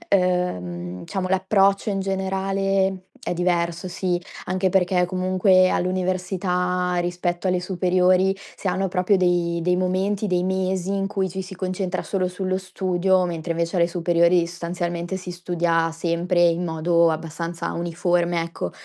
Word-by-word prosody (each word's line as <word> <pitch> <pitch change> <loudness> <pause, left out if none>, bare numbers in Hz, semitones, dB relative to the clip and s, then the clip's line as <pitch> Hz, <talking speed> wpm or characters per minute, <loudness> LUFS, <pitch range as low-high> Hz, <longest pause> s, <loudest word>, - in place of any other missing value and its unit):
uhm, 90 - -1
diciamo 185 - -3
l'approccio 195 +2 +2
in 195 - -1
generale 195 0 0 0.2
è - - -2
diverso 175 0 0
sì. 180 -1 -1 0.3
Anche 185 +1 0
perché 180 -1 +2
comunque 185 +1 +3
all'università, 180 0 0
rispetto 175 +1 -2
alle 180 0 +1
superiori, 185 +1 +2 0.2
si - - -5
hanno 190 +2 0
proprio 185 +2 +2
dei 175 -2 +1
dei 180 +2 +2
momenti, 190 +3 0
dei 180 -3 +1
mesi, 190 0 -1
in 195 0 0
cui 195 -1 -1
ci 190 +2 -4
si 190 +1 -9
concentra 185 0 -3
solo 185 -2 -1
sullo 185 0 -2
studio, 185 0 +1
mentre 170 -1 -3
invece 170 +2 -1
alle 170 -1 +3
superiori, 170 0 +2
sostanzialmente, 175 +1 -3
si 180 -1 -7
studia 170 -2 0
sempre 170 +2 -1
in 170 +1 0
modo 170 0 +2
abbastanza 165 +1 -4
uniforme, 175 0 0
ecco. 165 - -4
180 Hz, 140 wpm, -23 LUFS, 175-190 Hz, 0.3 s, comunque